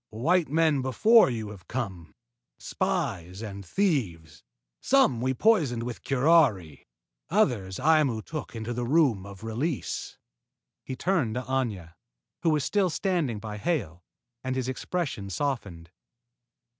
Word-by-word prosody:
"White 160 Hz, +10 st, +1 dB
men 155 Hz, -2 st, +2 dB
before 210 Hz, -, +5 dB
you 110 Hz, -4 st, -4 dB
have 100 Hz, -4 st, -12 dB
come: 95 Hz, -10 st, -5 dB, 0.4 s
spies 90 Hz, +4 st, -3 dB
and 100 Hz, -2 st, -7 dB
thieves. 90 Hz, -, -1 dB, 0.4 s
Some 250 Hz, -, +3 dB
we 130 Hz, +1 st, 0 dB
poisoned 145 Hz, -, +2 dB
with 120 Hz, 0 st, -6 dB
curari. 130 Hz, -, +2 dB, 0.4 s
Others 95 Hz, -6 st, +1 dB
Aimu 145 Hz, -6 st, +2 dB
took 155 Hz, -5 st, -6 dB
into 115 Hz, +1 st, -4 dB
the 120 Hz, 0 st, -3 dB
Room 130 Hz, -, +2 dB
of 100 Hz, 0 st, -11 dB
Release." 125 Hz, +7 st, -3 dB, 0.7 s
He 130 Hz, -, -5 dB
turned 145 Hz, -, 0 dB
to 125 Hz, -, -2 dB
Aña, 115 Hz, -10 st, -2 dB, 0.5 s
who 170 Hz, -, +2 dB
was 150 Hz, -3 st, +2 dB
still 200 Hz, +2 st, +1 dB
standing 165 Hz, -, -1 dB
by 105 Hz, 0 st, -6 dB
Hale, 100 Hz, -, -2 dB, 0.4 s
and 130 Hz, 0 st, -2 dB
his 130 Hz, -1 st, -2 dB
expression 130 Hz, -, -3 dB
softened. 95 Hz, -, -3 dB
125 Hz, 130 wpm, -27 LUFS, 100-155 Hz, 0.7 s, before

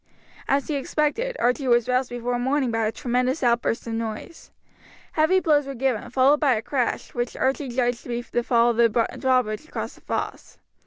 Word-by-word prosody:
As 275 Hz, 0 st, +1 dB
he 310 Hz, -, -2 dB
expected, 305 Hz, -, -1 dB
Archie 250 Hz, +2 st, +1 dB
was 240 Hz, -2 st, +3 dB
roused 255 Hz, 0 st, +1 dB
before 245 Hz, 0 st, -2 dB
morning 265 Hz, 0 st, 0 dB
by 225 Hz, -1 st, 0 dB
a -, -, -1 dB
tremendous 250 Hz, +4 st, -1 dB
outburst 235 Hz, -1 st, +1 dB
of 230 Hz, -, -4 dB
noise. 225 Hz, +8 st, -6 dB, 0.6 s
Heavy 320 Hz, +4 st, +3 dB
blows 295 Hz, -5 st, +2 dB
were 275 Hz, -, -5 dB
given, 255 Hz, -3 st, -1 dB
followed 270 Hz, +3 st, +4 dB
by 275 Hz, -5 st, +3 dB
a 215 Hz, -, -2 dB
crash, 255 Hz, -4 st, -2 dB
which 240 Hz, -1 st, -3 dB
Archie 270 Hz, +1 st, 0 dB
judged 245 Hz, -1 st, 0 dB
to -, -, -12 dB
be 240 Hz, 0 st, -2 dB
the 240 Hz, -, -2 dB
fall 235 Hz, 0 st, +3 dB
of 230 Hz, -, -5 dB
the 235 Hz, -1 st, +5 dB, 0.3 s
drawbridge 255 Hz, -1 st, +1 dB
across -, -, -5 dB
the -, -, -19 dB
fosse. -, -, -5 dB
250 Hz, 195 wpm, -24 LUFS, 235-275 Hz, 0.6 s, the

